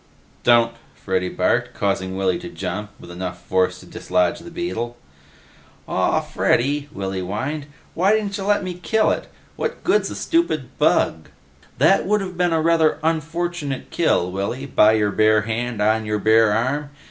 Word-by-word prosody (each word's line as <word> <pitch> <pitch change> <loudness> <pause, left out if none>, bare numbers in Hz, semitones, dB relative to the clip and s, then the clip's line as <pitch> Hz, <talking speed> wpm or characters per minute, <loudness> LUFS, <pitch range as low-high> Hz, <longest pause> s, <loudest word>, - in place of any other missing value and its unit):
"Don't," 120 -1 +4 0.2
Freddy 95 -1 -2
barked, - - 0
causing 95 -2 -1
Willy 95 - +1
to 175 0 -8
jump 105 -10 -5
with - - -11
enough 90 0 -5
force 95 0 +1
to - - -14
dislodge 90 +6 0
the 170 +1 -10
beetle. 120 -9 -4 0.9
"Aw, - - +1
Freddy," 140 +4 0
Willy 95 -5 -4
whined, 130 +11 -4 0.3
"why 190 +5 +3
dintcha 200 -1 -4
lemme 195 -3 +1
kill 220 +2 +2
it? - - -3 0.3
What - - -3
good's 415 +4 +2
a - - -6
stupid 240 - 0
bug?" 80 -1 +2 0.5
"That 160 +11 +4
would 210 +1 +2
have 185 -2 -5
been 175 0 +1
a 160 -1 +1
rather 165 -2 +3
unfortunate 165 -2 -2
kill, 90 - +1
Willy, 100 +8 -3
by 110 -5 +4
your 105 -2 +2
bare 110 +1 +4
hand 115 0 -2
on 110 +1 +1
your 105 0 0
bare 110 +1 +4
arm. 130 +7 0
125 Hz, 160 wpm, -21 LUFS, 105-170 Hz, 0.9 s, Don't